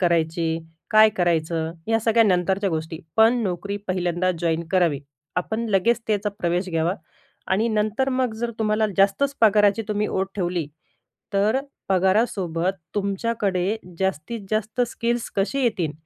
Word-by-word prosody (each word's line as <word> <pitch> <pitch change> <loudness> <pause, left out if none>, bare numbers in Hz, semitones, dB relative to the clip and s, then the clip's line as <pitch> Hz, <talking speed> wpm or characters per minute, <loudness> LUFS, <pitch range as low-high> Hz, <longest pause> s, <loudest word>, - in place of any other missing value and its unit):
करायची? 165 -2 +1 0.3
काय 215 -1 +7
करायचं? 165 -2 0
ह्या 225 0 +2
सगळ्या 230 +1 +4
नंतरच्या 190 0 +1
गोष्टी. 160 0 -3 0.2
पण 230 +2 +5
नोकरी 200 +1 -3
पहिल्यांदा 180 0 0
जॉइन 165 -1 0
करावी. 170 -7 +2 0.4
आपण 220 +6 -1
लगेच 220 +4 +2
त्याचा 210 -1 0
प्रवेश 175 +1 0
घ्यावा 165 +2 +1 0.6
आणि 215 +5 +2
नंतर 215 +4 0
मग 255 -3 0
जर 235 0 -2
तुम्हाला 215 0 +2
जास्तच 200 +9 +3
पगाराची 210 -1 +4
तुम्ही 210 0 0
ओढ 190 0 -1
ठेवली, 175 -4 -1 0.7
तर 205 +5 +3 0.3
पगारासोबत 190 -2 +1 0.2
तुमच्याकडे 200 -1 0 0.2
जास्तीत 190 +4 -2
जास्त 215 +3 -1
स्किल्स 235 0 -2
कशी 215 +8 0
येतील, 185 -10 0
195 Hz, 130 wpm, -23 LUFS, 175-220 Hz, 0.7 s, काय